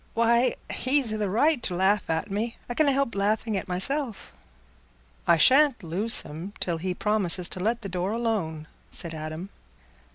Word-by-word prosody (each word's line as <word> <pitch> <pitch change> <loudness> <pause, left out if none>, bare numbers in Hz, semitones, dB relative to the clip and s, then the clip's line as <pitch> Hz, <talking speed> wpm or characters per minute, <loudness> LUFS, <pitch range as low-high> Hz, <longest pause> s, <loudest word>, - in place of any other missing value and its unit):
Why, 235 +2 +3 0.2
he's 260 -4 0
i' - - -2
the 210 -2 -1
right 280 +7 +2
to 180 - -2
laugh 190 +2 +1
at 160 +5 -2
me—I 230 +4 -4
canna 290 +2 +3
help 275 -3 0
laughing 210 +2 0
at 190 - -3
myself." 225 +7 -2 0.9
"I 170 - +5
shan't 265 - +5
loose 190 +8 +2
him 165 +7 -8
till 170 -2 -1
he 180 +1 -3
promises 190 -4 +3
to - - -3
let 225 +5 -1
the - - -4
door 185 +1 -2
alone," 210 -10 -2 0.2
said 170 -1 -3
Adam. 155 +4 -6
205 Hz, 165 wpm, -26 LUFS, 180-235 Hz, 0.9 s, I